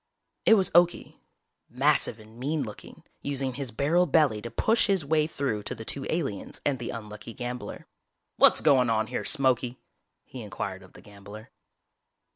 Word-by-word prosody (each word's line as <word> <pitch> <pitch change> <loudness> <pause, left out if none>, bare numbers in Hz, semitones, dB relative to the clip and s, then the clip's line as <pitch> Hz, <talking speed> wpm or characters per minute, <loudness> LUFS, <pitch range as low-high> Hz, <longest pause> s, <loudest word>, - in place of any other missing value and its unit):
It 225 - +8
was 195 -3 +2
Okie, 175 +1 +2 0.5
massive 135 -2 +2
and 110 +2 -15
mean 145 +3 -1
looking, 105 -4 -10 0.2
using 135 -2 -2
his 135 0 -5
barrel 155 +10 +2
belly 140 -8 +3
to 120 - -6
push 225 - +2
his 195 -6 +1
way 155 +1 +2
through 135 -9 -2
to - - -5
the 110 - -9
two 135 +3 -4
aliens 135 - -3
and 140 -3 0
the 120 - -5
unlucky 105 0 -8
gambler. 125 0 -6 0.5
"What's - - +6
goin' 130 -5 +4
on 110 -1 +1
here, - - -4
Smokey?" 130 -3 +1 0.5
he 130 - -10
inquired 100 -2 -5
of 95 - -17
the - - -14
gambler. 105 +2 -12
130 Hz, 165 wpm, -27 LUFS, 110-150 Hz, 0.5 s, It